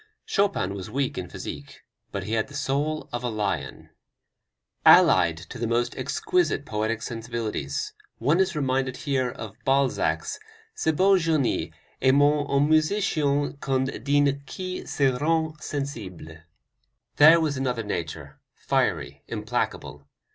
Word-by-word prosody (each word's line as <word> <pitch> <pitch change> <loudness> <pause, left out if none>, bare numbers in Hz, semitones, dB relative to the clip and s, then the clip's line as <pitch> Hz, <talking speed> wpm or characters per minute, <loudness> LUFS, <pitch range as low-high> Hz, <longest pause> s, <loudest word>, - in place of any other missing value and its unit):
Chopin 200 - 0
was 95 -2 -6
weak 135 -1 -1
in 90 -2 -5
physique, 70 -1 -8 0.3
but - - -4
he - - -6
had 110 -1 +1
the 140 - -12
soul 150 +4 -1
of 120 0 -3
a 125 - -1
lion. 100 - -3 0.9
Allied 85 -1 +6
to 90 +9 -10
the 115 - -1
most 120 +1 0
exquisite 355 - 0
poetic 110 +1 -2
sensibilities 115 - -4 0.2
one 145 +9 +2
is 190 -2 +2
reminded 130 -2 0
here 135 -4 0
of 110 -3 -8
Balzac's 135 0 +1 0.3
"Ce 430 - -1
beau 190 +4 +4
genie 150 - 0 0.3
est 130 +1 +4
moins 145 0 +3
un 140 +1 +3
musicien 155 -4 +1
qu'une 130 -4 -1
dine 140 0 +2
qui 185 0 -5
se 135 -3 +1
rend 160 +1 +1
sensible" 110 - -5 0.8
there 160 +3 +8
was 155 -3 0
another 125 -3 -1
nature, 85 -6 -5
fiery, - - -1
implacable. 70 -1 -3
135 Hz, 135 wpm, -25 LUFS, 110-150 Hz, 0.9 s, there